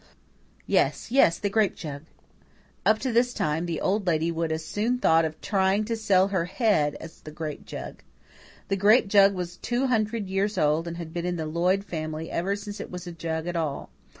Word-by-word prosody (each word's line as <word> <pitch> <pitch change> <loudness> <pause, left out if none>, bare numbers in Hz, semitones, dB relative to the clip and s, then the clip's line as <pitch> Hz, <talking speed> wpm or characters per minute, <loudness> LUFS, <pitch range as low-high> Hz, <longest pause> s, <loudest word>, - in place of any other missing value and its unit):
Yes, - - +1
yes, 210 -10 +5
the 205 - -2
grape 215 -2 +2
jug!" 145 -2 -7 0.8
Up 215 - +5
to 255 +3 -2
this 245 +1 +2
time, 155 +3 -1
the 165 -2 -2
Old 200 0 0
Lady 165 0 +1
would 165 -1 -2
as 160 0 -3
soon 215 +8 0
have 250 - -3
thought 160 0 +4
of 155 0 -5
trying 195 +1 +1
to 230 +1 -1
sell 200 -4 +3
her 185 -4 0
head 180 - +1
as 165 - -11
the - - -9
grape 155 -1 -6
jug. - - -7 0.7
The 195 - +1
grape 210 +4 +5
jug 200 -1 +5
was 175 -1 -5
two 245 +6 -1
hundred 220 -4 0
years 195 +2 -1
old 155 +1 +2
and 170 0 -5
had 165 -2 -7
been 175 0 -2
in 180 - -1
the 160 -2 -3
Lloyd 180 +5 +1
family 155 -3 -5
ever 190 +4 0
since 205 0 -7
it - - -6
was 180 0 -7
a 175 - -6
jug 165 -1 -4
at 175 0 -3
all. 155 -4 -3
180 Hz, 210 wpm, -26 LUFS, 160-205 Hz, 0.8 s, yes